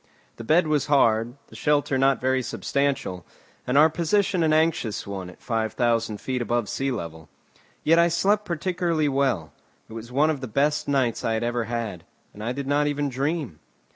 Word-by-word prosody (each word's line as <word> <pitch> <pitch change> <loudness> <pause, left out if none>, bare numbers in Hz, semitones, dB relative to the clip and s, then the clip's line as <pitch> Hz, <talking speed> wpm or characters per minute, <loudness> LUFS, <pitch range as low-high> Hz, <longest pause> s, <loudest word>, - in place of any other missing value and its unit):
The 115 - -7
bed 160 +9 +3
was 150 -2 0
hard, 120 -4 +3
the - - -14
shelter 145 -2 +1
not 135 0 +3
very 130 0 +1
substantial, 135 -9 -2 0.4
and 125 +2 +2
our 155 +2 +8
position 180 +4 +1
an 160 -1 +3
anxious 155 -8 +1
one, 95 -2 -6
at 90 - -16
five 110 -2 -1
thousand 115 -3 0
feet 130 -1 -3
above 120 0 0
the - - -7
sea 135 0 -1
level. 80 - -6 0.5
Yet 165 +2 +4
I 170 - +5
slept 195 +5 +2
particularly 170 -3 -1
well; 135 - 0 0.3
it - - -12
was 115 +1 -8
one 150 +5 +3
of 145 -4 -4
the 130 - -4
best 145 +7 0
nights 130 -5 0
I 115 - 0
had 110 - -1
ever 120 -1 -1
had, 110 -7 -4 0.3
and 105 - -9
I 115 - -1
did 140 +2 -4
not 145 +2 +1
even 145 -1 -1
dream. 135 - -2
135 Hz, 195 wpm, -24 LUFS, 115-155 Hz, 0.5 s, our